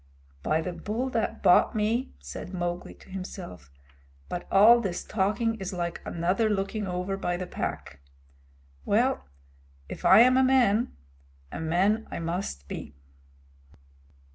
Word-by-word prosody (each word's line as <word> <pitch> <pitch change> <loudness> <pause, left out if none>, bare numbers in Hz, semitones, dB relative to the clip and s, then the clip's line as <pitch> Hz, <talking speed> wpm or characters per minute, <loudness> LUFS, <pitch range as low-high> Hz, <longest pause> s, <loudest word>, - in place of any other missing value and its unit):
"By 155 - +1
the 180 +2 -4
Bull 215 +9 -3
that 225 -2 -2
bought 180 - +5
me," 220 +4 0
said 70 - -8
Mowgli 175 0 -4
to - - -19
himself, 185 - -8 0.6
"but 175 - -5
all 220 +5 +7
this 185 -5 -3
talking 215 +3 0
is 190 0 -5
like 175 -1 -3
another 185 +6 0
looking 205 0 -2
over 180 +2 -2
by 175 -2 -2
the 185 - -4
Pack! 125 - -5 0.8
Well, 70 - +1 0.6
if - - -8
I - - +8
am 255 +1 +6
a 260 - +5
man, 245 -4 +3 0.6
a - - -6
man 190 +7 +1
I - - -5
must 165 - -4
become." 70 - -7
190 Hz, 140 wpm, -27 LUFS, 175-220 Hz, 0.8 s, I